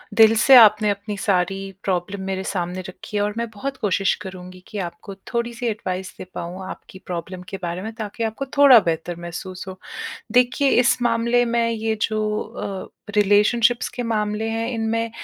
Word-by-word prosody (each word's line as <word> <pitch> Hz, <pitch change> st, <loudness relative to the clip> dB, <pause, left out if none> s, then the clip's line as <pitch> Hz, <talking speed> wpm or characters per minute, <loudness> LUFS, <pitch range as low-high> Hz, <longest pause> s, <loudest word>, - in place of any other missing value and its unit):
दिल 225 Hz, 0 st, +7 dB
से 270 Hz, -, +8 dB
आपने 215 Hz, -2 st, +7 dB
अपनी 205 Hz, +1 st, -3 dB
सारी 195 Hz, 0 st, 0 dB
प्रॉब्लम 190 Hz, +1 st, -2 dB
मेरे 190 Hz, 0 st, -2 dB
सामने 180 Hz, -1 st, -3 dB
रखी 210 Hz, -, -7 dB
है 205 Hz, -, +2 dB
और 205 Hz, 0 st, -1 dB
मैं 235 Hz, -1 st, -2 dB
बहुत 265 Hz, +6 st, -5 dB
कोशिश 195 Hz, -3 st, +1 dB
करूँगी 185 Hz, -1 st, -9 dB
कि 215 Hz, -, -7 dB
आपको 175 Hz, +2 st, -6 dB, 0.2 s
थोड़ी-सी 235 Hz, +1 st, -2 dB
एडवाइस 190 Hz, -4 st, -3 dB
दे -, -, -7 dB
पाऊँ 180 Hz, +3 st, -6 dB
आपकी 190 Hz, -, -10 dB
प्रॉब्लम 180 Hz, +1 st, -5 dB
के 195 Hz, -, -5 dB
बारे 175 Hz, +1 st, -3 dB
में 220 Hz, +2 st, -5 dB
ताकि 220 Hz, 0 st, -5 dB
आपको 225 Hz, +5 st, -2 dB
थोड़ा 275 Hz, -5 st, +9 dB
बेहतर 165 Hz, +1 st, -2 dB
महसूस 185 Hz, +2 st, -7 dB
हो। 185 Hz, 0 st, -8 dB, 0.5 s
देखिए 250 Hz, +3 st, +3 dB
इस 250 Hz, 0 st, +3 dB
मामले 235 Hz, +1 st, +2 dB
में 235 Hz, 0 st, +1 dB
ये 220 Hz, -1 st, -1 dB
जो 215 Hz, -1 st, 0 dB
अ, 205 Hz, -2 st, -7 dB
रिलेशनशिप्स 210 Hz, +4 st, +3 dB
के 245 Hz, -, -3 dB
मामले 215 Hz, -1 st, -1 dB
हैं 225 Hz, +1 st, -2 dB
इनमें 230 Hz, 0 st, -1 dB
210 Hz, 175 wpm, -22 LUFS, 190-230 Hz, 0.5 s, थोड़ा